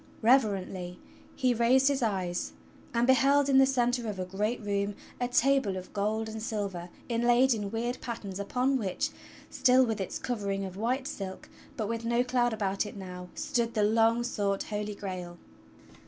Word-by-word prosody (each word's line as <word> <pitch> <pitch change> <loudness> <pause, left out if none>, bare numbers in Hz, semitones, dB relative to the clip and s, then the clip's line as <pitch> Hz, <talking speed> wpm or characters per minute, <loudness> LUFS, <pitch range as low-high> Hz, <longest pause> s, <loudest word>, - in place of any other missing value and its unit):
Reverently 195 -7 +2 0.4
he 255 -2 +2
raised 245 +3 +4
his 280 -1 +2
eyes 185 -6 -1 0.4
and 235 0 +2
beheld 275 +2 +4
in 270 -1 +6
the 270 - +6
centre 245 -2 +1
of 205 - -5
a 185 - -2
great 210 +6 -2
room 200 -1 -1 0.2
a 245 - 0
table 250 -5 +2
of 185 - -9
gold 215 +2 -1
and 220 0 -6
silver 200 -6 -3 0.2
inlaid 240 +2 +3
in 205 -3 -3
weird 235 +3 -3
patterns 200 -5 -5
upon 255 +6 +1
which, 190 -5 -2 0.4
still 255 +1 +5
with 225 -3 -2
its 190 - -3
covering 200 -5 -2
of 185 -1 -7
white 250 +6 -1
silk, 190 -1 -6 0.3
but 215 - -1
with 230 +1 -3
no 235 +1 +2
cloud 245 -1 +1
about 200 -3 -1
it 205 - -9
now, 180 -2 -8
stood 235 -5 -1
the 210 - +2
long 225 +2 +3
sought 200 -4 -1
Holy 210 -1 -4
Grail! 180 -3 -6
220 Hz, 170 wpm, -29 LUFS, 200-245 Hz, 0.4 s, in